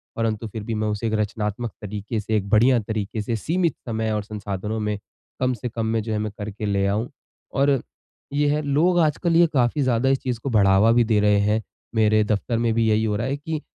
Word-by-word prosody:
परंतु 115 -1 -1
फिर 110 0 -7
भी 115 - -3
मैं 110 0 -1
उसे 105 +2 -2
एक 110 - -2
रचनात्मक 105 +1 -2
तरीके 105 +2 -4
से, 110 +1 -2
एक 100 -1 -3
बढ़िया 120 +4 +5
तरीके 110 0 -3
से, 115 +3 -2
सीमित 165 - 0
समय 110 -1 -1
और 105 -1 -1
संसाधनों 105 0 -4
में 105 -1 -1 0.4
कम 130 0 +1
से 125 +1 -5
कम 115 0 -3
में 110 0 0
जो 110 0 -3
है 105 - 0
मैं 105 0 -2
करके 105 0 -5
ले 100 -1 +1
आऊँ। 105 +5 -1 0.4
और 140 -2 +2 0.5
ये 145 +1 +2
है, 150 - -1
लोग 155 +5 +2
आजकल 165 +2 +2
ये 170 0 +6
काफ़ी 130 +1 +2
ज़्यादा 130 0 +2
इस 135 0 +2
चीज़ 125 -3 -2
को 140 - -2
बढ़ावा 100 -1 +4
भी 120 +1 +4
दे 110 -2 +2
रहें 105 0 +4
हैं। 110 +1 +2 0.3
मेरे 110 -1 +4
दफ्तर 105 +2 -1
में 115 -1 +1
भी 115 0 +2
यहीं 110 +1 +2
हो 105 - 0
रहा 110 +5 -1
है 140 +2 -1
कि 155 +1 -4
110 Hz, 230 wpm, -23 LUFS, 105-125 Hz, 0.5 s, ये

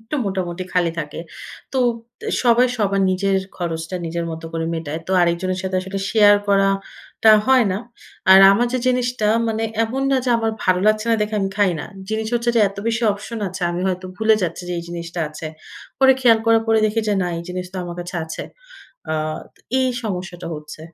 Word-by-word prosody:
একটু 225 +7 -5
মোটামুটি 185 -2 -3
খালি 175 -2 +2
থাকে। 150 -1 -5 0.5
তো 265 - 0 0.4
তে - - -8 0.2
সবাই 245 +1 +5
সবার 200 -1 +1
নিজের 195 +1 +1 0.2
খরচটা 165 0 -4
নিজের 170 +1 -3
মত 160 0 -7
করে 165 0 -2
মেটায়। 160 -1 -4
তো - - -6
আরেকজনের 180 +2 0
সাথে 185 0 -2
আসলে 190 +1 -5
শেয়ার 205 -2 +6
করাটা 195 +2 +1 0.2
হয় 260 -3 +5
না। 190 - -2 0.5
আর 190 - +10
আমার 240 +4 +2
যে, 255 - +1
জিনিসটা 250 -3 +1 0.2
মানে 220 0 -1 0.2
এমন 260 +4 -3
না 270 - +3
যে, - - -1
আমার 225 -1 0
ভালো 185 0 +3
লাগছে 215 +1 +3
না 230 - +5
দেখে 210 +1 -1
আমি 195 - 0
খাই 200 -3 +3
না। - - -5 0.2
জিনিস 220 0 -2
হচ্ছে 235 0 +1
যে, - - +5
এত 200 - -14
বেশি 230 +1 0
অপশন 210 +3 -7
আছে, 185 +1 -8
আমি 175 +1 -3
হয়তো 185 0 -2
ভুলে 220 +1 +4
যাচ্ছি 175 +1 -3
যে, - - -2
এই - - -4
জিনিসটা 170 0 -5
আছে। 155 +1 -8 0.5
পরে 265 0 +7
খেয়াল 230 -3 +5
করার 225 0 +4
পরে 225 0 +3
দেখি 215 +2 0
যে, - - +2
না 180 - -1
এই 170 - -5
জিনিস 180 0 -4
তো 190 - -7
আমার 175 0 -7
কাছে 175 +1 -6
আছে। 160 - -6 0.7
আ - - 0 0.4
তো - - -29 0.2
এই 260 0 +2
সমস্যাটা 180 -4 -5
হচ্ছে। 150 +1 -9
195 Hz, 205 wpm, -20 LUFS, 175-225 Hz, 0.7 s, আর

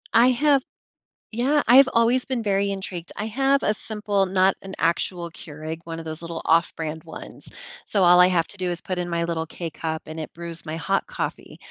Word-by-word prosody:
I 240 +2 +7
have 280 +1 +3 0.7
yeah, 275 +6 +2
I've 265 +3 +8
always 235 +2 +3
been 250 -4 -2
very 200 -1 +1
intrigued. 185 -3 -5
I 210 - -3
have 270 +4 +2
a 210 - +2
simple, 210 -2 -1
not 190 +1 +2
an 195 0 -8
actual 170 +1 0
Keurig, 155 0 -7
one 165 -1 -5
of 165 - -6
those 160 0 -6
little 170 -1 -5
off-brand 160 -1 0
ones, 160 - -10 0.4
so 200 -3 +1
all 180 0 +7
I 180 - +8
have 170 -3 +1
to 205 - -11
do 180 -1 -2
is 175 0 -3
put 185 -1 -4
in 175 0 -2
my 170 -1 -1
little 165 -1 -2
K-Cup, 160 -1 -5
and 160 +1 -7
it 155 - -7
brews 170 -1 -7
my 155 +1 -4
hot 195 +4 -1
coffee. - - -5
180 Hz, 205 wpm, -24 LUFS, 165-215 Hz, 0.7 s, I've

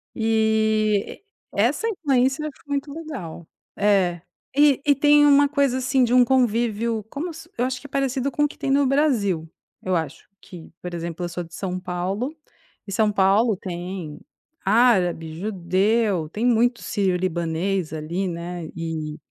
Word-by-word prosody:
E 220 -2 +1 0.3
e - - -3
essa 455 - +1
influência 285 - +1
ficou 285 - -16
muito 285 0 -2
legal. 255 - -7 0.3
É. 190 -4 +2 0.3
E 285 -2 +4
e 290 -1 +5
tem 290 +1 +5
uma 285 0 +6
coisa 280 -3 +1
assim 260 0 +2
de 240 0 +1
um 250 0 +7
convívio, 235 -3 +1
como 325 +7 -5
se 330 +2 -12
eu 245 - +1
acho 255 -1 -3
que 285 - -10
é - - -28
parecido 270 0 -1
com 295 - 0
o - - +4
que - - -14
tem - - -3
no 280 +1 +4
Brasil, 225 - +1 0.3
eu 185 -1 -1
acho 160 -2 -4
que, 180 -5 -12
por 180 -1 -6
exemplo: 170 +1 -4
eu 175 - -4
sou 175 +1 -4
de 165 - -16
São 185 -1 -3
Paulo 190 - -3 0.5
e - - -6
São 215 +1 +2
Paulo 200 +3 +3
tem 175 -4 -6 0.5
árabe, 190 -7 +3
judeu, 190 -1 0
tem 215 +7 -3
muito 240 0 +2
síriolibanês 180 -2 -1
ali, 170 +5 -3
né, 170 -1 -5
e 160 -2 -4
215 Hz, 160 wpm, -23 LUFS, 175-260 Hz, 0.5 s, um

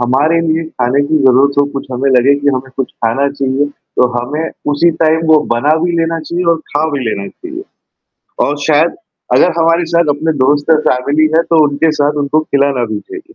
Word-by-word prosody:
हमारे 140 +7 +1
लिए 160 +1 0 0.2
खाने 125 +3 +2
की 155 0 +2
ज़रूरत 135 +2 +4
हो - - +3
कुछ 140 - -5
हमें 130 +2 -1
लगे 130 +2 +4
कि 145 - 0
हमें 130 +1 -5
कुछ 135 - -3
खाना 120 +5 -1
चाहिए, 140 0 -1
तो 140 -3 -2
हमें 150 +7 -3 0.2
उसी 170 +4 +3
टाइम 160 +1 +2
वो 155 - +6 0.2
बना 145 +6 +2
भी 175 - 0
लेना 165 0 -1
चाहिए 170 +3 -4
और 165 - 0
खा 150 +2 0
भी 145 - -3
लेना 100 -2 -4
चाहिए। 350 +1 -9 0.8
और 145 - -2
शायद 155 +2 +2 0.4
अगर 180 - +4
हमारे 165 +1 +2
साथ 170 -3 +2
अपने 160 +2 -1
दोस्त 145 +2 +1
और 155 -1 +4
फैमिली 145 +5 +1
हैं 165 - +3
तो 160 -2 +3
उनके 145 +3 0
साथ 145 0 0
उनको 145 +2 +1
खिलाना 140 -4 0
भी 105 - -3
चाहिए। 370 - -10
145 Hz, 200 wpm, -13 LUFS, 135-160 Hz, 0.8 s, वो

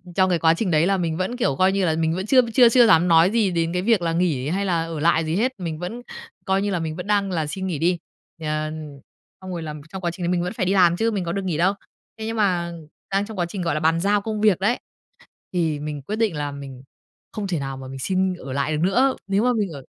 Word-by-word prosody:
trong 185 -1 +3
cái 175 -2 +1
quá 160 0 +4
trình 185 +1 -1
đấy 155 +2 +3
là 195 0 +2
mình 165 -3 -2
vẫn, 215 +7 -2
kiểu, 140 - +1
coi 185 +6 +3
như 195 -1 +1
là 160 - +1
mình 160 0 0
vẫn 185 +1 -3
chưa 255 +4 +5
chưa 245 -3 +7
chưa 240 0 +6
dám 165 -2 +5
nói 165 +2 +5
gì 220 -4 +2
đến 165 -1 -1
cái 180 - 0
việc 215 0 +2
là 165 -1 0
nghỉ 165 -7 0
hay 195 +4 -1
là 170 -4 +1
ở 165 -2 -5
lại 165 +1 +2
gì 160 +2 -1
hết, 245 +6 +1
mình 165 -4 -4
vẫn 185 +8 -5 0.4
coi 190 0 +1
như 205 0 -1
là 180 - 0
mình 160 -1 -3
vẫn 180 +3 -7
đang 200 -2 +1
là 160 -4 -1
xin 190 +5 -4
nghỉ 165 -6 -3
đi, 175 +3 +2 0.4
ờ, 155 0 -2 0.7
xong 185 0 -7
rồi 170 -2 -4
là, 155 -1 -5 0.2
trong 190 +2 -7
quá 175 -2 -1
trình 175 +1 -7
đấy - - 0
mình 175 -1 +1
vẫn 180 - -3
phải 185 - -1
đi 190 - +1
làm 175 -3 +4
chứ, 225 +3 +1
mình 200 -4 -2
có 170 - -2
được 195 +2 -2
nghỉ 170 -5 -1
đâu. 185 +4 +3 0.5
Thế 220 - -4
nhưng 225 +1 -3
mà 180 -5 +1 0.4
đang 195 +1 +1
trong 220 -1 -9
quá 175 - +1
trình, 180 +2 -6
gọi 170 - 0
là, - - 0
bàn 160 +2 +2
giao 205 +3 +2
công 215 0 -3
việc 210 -5 +4
đấy 210 +6 +1 0.7
thì 160 -4 0
mình 150 -1 -5
quyết 205 +11 -4
định 220 -6 0
là 145 -1 -3
mình 135 -2 -9 0.5
không 210 -2 -4
thể 175 -4 -1
nào 135 -1 -5
mà 130 0 -8
mình 135 0 -8
xin 185 +5 0
ở 135 -6 -8
lại 140 +3 -1
được - - -2
nữa, 255 +9 +3
nếu 200 +2 +1
mà 250 0 +3
mình 210 -4 0
ở 140 -3 -9
180 Hz, 290 wpm, -23 LUFS, 160-200 Hz, 0.7 s, chưa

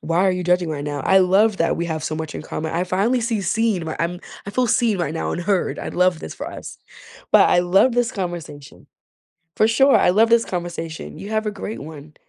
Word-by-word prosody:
Why 165 +2 -1
are - - +4
you 180 0 -3
judging 180 -1 +2
right 145 -2 -4
now?” 145 -1 -3
I 190 +7 +4
love 195 +3 +3
that 165 - +1
we 170 - -2
have 160 -1 -4
so 155 - -2
much 160 -1 -5
in - - -6
common. 160 0 -5
I 175 +2 0
finally 205 +7 +1
see 225 -2 -1
seen 205 -1 0
where 160 - -5
I'm 175 +1 -2 0.3
I - - -4
feel 250 +4 +1
seen 225 -3 +1
right 165 -2 -2
now - - -2
and 175 - -3
heard. 195 0 0
I'd - - -6
love 180 -2 +2
this 80 - -8
for - - -6
us, - - -9 0.5
but - - +6
I 175 - +4
love 195 +8 +3
this 245 -1 0
conversation. 175 -7 -7 0.7
For 215 - +4
sure, 270 +5 +4
I - - +4
love 220 +4 +4
this 235 0 +4
conversation. 170 -2 -6
You 200 - -8
have 220 0 -1
a - - 0
great 210 +1 -7
one. 150 0 -11
180 Hz, 240 wpm, -21 LUFS, 165-215 Hz, 0.7 s, but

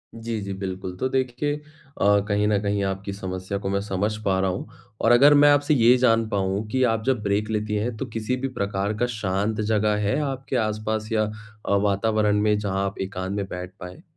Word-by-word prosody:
जी, 115 0 -4
जी, 100 -1 -4
बिल्कुल। 95 -1 -5
तो 130 - 0
देखिए 130 +2 -1 0.5
अ, 100 0 +5
कहीं 105 0 +1
न 105 -1 +2
कहीं 100 -1 0
आपकी 95 +1 -3
समस्या 95 0 -4
को 95 - -3
मैं 100 0 0
समझ 105 +1 -1
पा 95 -1 +2
रहा 95 0 +1
हूँ। 90 - -5 0.3
और 115 - +4
अगर 140 +5 +7
मैं 145 0 +7
आपसे 145 +1 +3
ये 120 -2 +6
जान 115 -3 +3
पाऊँ 100 +1 -1
कि 130 +4 0
आप 115 -2 +1
जब 130 -4 +1
ब्रेक 100 +1 0
लेती 105 -1 -1
हैं, 110 +3 -1
तो 135 - -3
किसी 115 +1 -2
भी 130 +1 -3
प्रकार 100 -4 -2
का 120 - +1
शांत 105 +2 -1
जगह 105 0 +1
है 105 - +1
आपके 135 -2 -3
आसपास 110 +1 -3
या 110 -1 +2 0.4
अ, 100 - +2
वातावरण 105 +1 +2
में 105 0 +3
जहाँ 100 -1 -1
आप 100 - -4
एकांत 95 0 -4
में 100 -1 -2
बैठ 90 +1 -6
पाएँ? 90 - -10
105 Hz, 210 wpm, -24 LUFS, 100-115 Hz, 0.5 s, अगर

